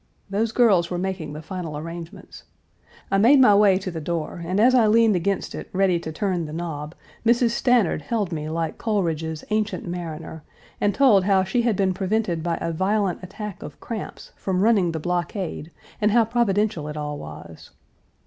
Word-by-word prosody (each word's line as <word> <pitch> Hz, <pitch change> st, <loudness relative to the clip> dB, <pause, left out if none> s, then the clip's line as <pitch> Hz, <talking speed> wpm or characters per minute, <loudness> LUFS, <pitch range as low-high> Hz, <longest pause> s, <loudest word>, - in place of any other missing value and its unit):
Those 215 Hz, +3 st, 0 dB
girls 200 Hz, -8 st, +3 dB
were 180 Hz, -, -2 dB
making 180 Hz, -5 st, -3 dB
the 155 Hz, +1 st, -8 dB
final 170 Hz, -4 st, -5 dB
arrangements. 170 Hz, +4 st, -9 dB, 0.7 s
I 195 Hz, -, +3 dB
made 260 Hz, +7 st, +6 dB
my 250 Hz, -6 st, +7 dB
way 200 Hz, -2 st, +5 dB
to 190 Hz, -1 st, -5 dB
the 165 Hz, -1 st, -5 dB
door, 170 Hz, +1 st, -3 dB
and 185 Hz, +4 st, -1 dB
as 245 Hz, +4 st, +5 dB
I 240 Hz, -4 st, +5 dB
leaned 225 Hz, -1 st, +4 dB
against 195 Hz, +3 st, -1 dB
it -, -, -7 dB
ready 185 Hz, -2 st, +2 dB
to 160 Hz, -, -6 dB
turn 180 Hz, 0 st, -1 dB
the 150 Hz, -, -8 dB
knob, 160 Hz, -2 st, -5 dB, 0.3 s
Mrs. 235 Hz, 0 st, +3 dB
Stanard 240 Hz, -, +2 dB
held 205 Hz, +3 st, -2 dB
me 155 Hz, -2 st, -4 dB
like 165 Hz, 0 st, -3 dB
Coleridge's 165 Hz, -7 st, -1 dB
Ancient 215 Hz, -2 st, -1 dB
Mariner, 165 Hz, -2 st, -6 dB, 0.4 s
and 205 Hz, -1 st, +2 dB
told 220 Hz, -9 st, +5 dB
how 195 Hz, -1 st, +3 dB
she 190 Hz, +6 st, 0 dB
had 235 Hz, -3 st, +1 dB
been 190 Hz, -1 st, +1 dB
prevented 190 Hz, -2 st, -1 dB
by 170 Hz, 0 st, -1 dB
a 165 Hz, -, -2 dB
violent 195 Hz, +2 st, 0 dB
attack 205 Hz, +2 st, -7 dB
of -, -, -9 dB
cramps 225 Hz, -4 st, -7 dB
from 185 Hz, -1 st, -1 dB
running 205 Hz, -6 st, +3 dB
the 160 Hz, -, -4 dB
blockade, 175 Hz, 0 st, -3 dB, 0.3 s
and 210 Hz, -, +4 dB
how 230 Hz, +1 st, +4 dB
providential 210 Hz, -7 st, 0 dB
it 150 Hz, 0 st, -6 dB
all 150 Hz, -1 st, -4 dB
was. 80 Hz, +1 st, -10 dB
185 Hz, 185 wpm, -23 LUFS, 165-210 Hz, 0.7 s, my